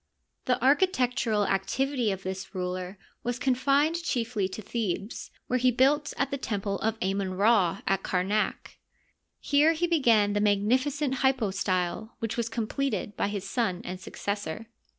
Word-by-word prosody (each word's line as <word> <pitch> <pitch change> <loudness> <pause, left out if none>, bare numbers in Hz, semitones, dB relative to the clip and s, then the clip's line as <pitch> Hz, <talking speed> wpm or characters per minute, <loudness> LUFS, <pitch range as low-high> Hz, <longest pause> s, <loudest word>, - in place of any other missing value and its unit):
The 250 - +1
architectural 250 - +2
activity 240 +5 0
of 190 0 -5
this 190 0 -6
ruler 180 +1 -4 0.2
was 245 0 -2
confined 280 +6 +2
chiefly 230 - -1
to 190 - -7
Thebes, 205 -1 -3 0.2
where 255 - 0
he 255 +1 +4
built 275 +4 +2
at 275 - 0
the 275 - -2
temple 200 -4 -2
of 220 0 -1
Amon 190 0 -1
Ra 200 -3 +3
at 195 -1 +1
Kamak. 195 +4 -1 0.6
Here 295 +3 +4
he 330 +2 0
began 235 -11 +3
the 205 - +1
magnificent 255 +8 +1
hypo 260 -6 +2
style, 190 +2 -2
which 230 -1 -3
was 235 -1 -1
completed 230 -1 -2
by - - 0
his 200 -1 -4
son 195 -5 0
and 180 +1 -5
successor. 205 +2 -5
220 Hz, 150 wpm, -28 LUFS, 195-260 Hz, 0.6 s, he